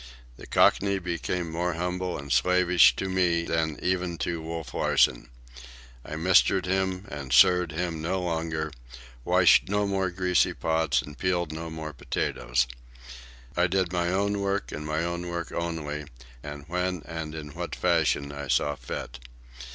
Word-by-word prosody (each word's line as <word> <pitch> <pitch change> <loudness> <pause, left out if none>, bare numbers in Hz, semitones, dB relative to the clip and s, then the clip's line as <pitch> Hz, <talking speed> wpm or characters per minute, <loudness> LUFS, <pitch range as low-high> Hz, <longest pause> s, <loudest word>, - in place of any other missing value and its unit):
The - - -12
Cockney 100 0 +3
became 85 -1 -3
more 85 +2 -1
humble 90 +1 -2
and 70 0 -8
slavish 90 -1 +5
to 95 - -3
me 90 -3 +1
than 80 -2 -1
even 90 -2 0
to 85 -1 -3
Wolf 80 -1 -6
Larsen. - - +2 0.7
I 75 - -6
mistered 90 +2 +4
him 95 +1 -1
and 70 -3 -6
sirred 90 +5 +5
him 85 -1 -3
no 90 +4 -1
longer, 80 -3 -2 0.5
washed - - +5
no 105 0 +1
more 95 -2 0
greasy 90 0 +1
pots, 80 -5 +1
and 75 +2 -11
peeled 90 -3 0
no 80 +1 -5
more 80 -1 -6
potatoes. - - -1 0.9
I 90 +1 +3
did 95 -1 0
my 85 -1 +1
own 100 +2 0
work, 100 0 -1
and 75 0 -6
my 75 +1 -1
own 85 +1 -3
work 85 -1 -4
only, 80 -3 -3 0.4
and 75 +1 -8
when 90 -2 -2
and 80 -1 -6
in 75 -2 -7
what 70 - -5
fashion 70 0 +1
I 70 0 -6
saw 75 +3 +2
fit. - - -7
85 Hz, 155 wpm, -27 LUFS, 80-90 Hz, 0.9 s, slavish